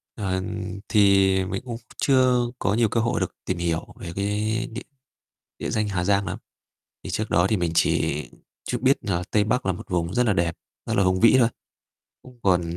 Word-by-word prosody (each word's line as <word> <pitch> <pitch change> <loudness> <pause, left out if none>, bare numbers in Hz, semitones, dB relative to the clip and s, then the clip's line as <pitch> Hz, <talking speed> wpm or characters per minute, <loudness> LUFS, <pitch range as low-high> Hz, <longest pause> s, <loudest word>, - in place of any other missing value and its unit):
Ờ, 95 -3 -2 0.5
thì 100 -2 +5
mình 95 +1 -3
cũng 120 -2 -5 0.2
chưa 130 -2 +4 0.2
có 100 - +1
nhiều 115 -1 +2
cơ 115 - 0
hội 115 +1 0
được - - -3
tìm 90 - -2
hiểu 85 -2 -1
về 85 - -6
cái 105 +3 -1
địa 115 - -6 0.8
địa - - -3
danh 110 -2 0
Hà 95 -3 -1
Giang 100 +1 +2
lắm, - - -3 0.7
thì - - -5
trước 110 0 -2
đó 85 +2 +3
thì 110 - +2
mình 85 -3 0
chỉ 75 -2 +1 0.5
chút 125 - -1
biết 135 +1 +4
là 90 -3 -1
Tây 105 -1 +3
Bắc 115 -1 0
là 95 - +2
một 90 - -9
vùng 85 -1 -1
rất 125 0 +2
là 105 - +3
đẹp, 85 -3 0 0.3
rất - - -1
là 100 - +4
hùng 95 0 +2
vĩ 115 +3 +6
thôi, 115 -3 +5 0.7
cũng 125 -1 -16
còn 90 -3 +3
100 Hz, 205 wpm, -24 LUFS, 90-115 Hz, 0.8 s, vĩ